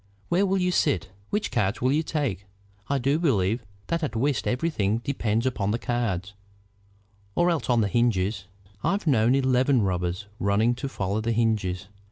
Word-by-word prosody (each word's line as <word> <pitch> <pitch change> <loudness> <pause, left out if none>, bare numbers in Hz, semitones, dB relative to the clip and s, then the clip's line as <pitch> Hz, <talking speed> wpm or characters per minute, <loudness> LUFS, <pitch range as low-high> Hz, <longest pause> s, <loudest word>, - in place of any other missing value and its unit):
Where 190 +3 +3
will 195 +1 +1
you 180 -1 +1
sit? 95 - +1 0.2
Which 210 +1 -1
cards 105 -2 0
will 130 +1 +2
you 150 +3 +2
take? 135 - -2 0.4
I 140 - +2
do 135 +4 +1
believe 115 - +1 0.2
that 170 0 -1
at 145 -7 -2
whist 135 +4 0
everything 125 -7 0
depends 115 -4 0
upon 110 -6 0
the 110 - +1
cards, 105 -6 -2 1.0
or 175 +1 +3
else 165 -5 -2
on 120 -2 +4
the 105 - +2
hinges. 100 -3 +1 0.4
I've 200 -1 0
known 125 -4 +4
eleven 130 -2 +3
rubbers 90 0 -1
running 105 +4 +2
to 135 +3 -4
follow 100 -2 -2
the 115 +1 0
hinges. 105 -5 0
120 Hz, 170 wpm, -26 LUFS, 100-140 Hz, 1.0 s, on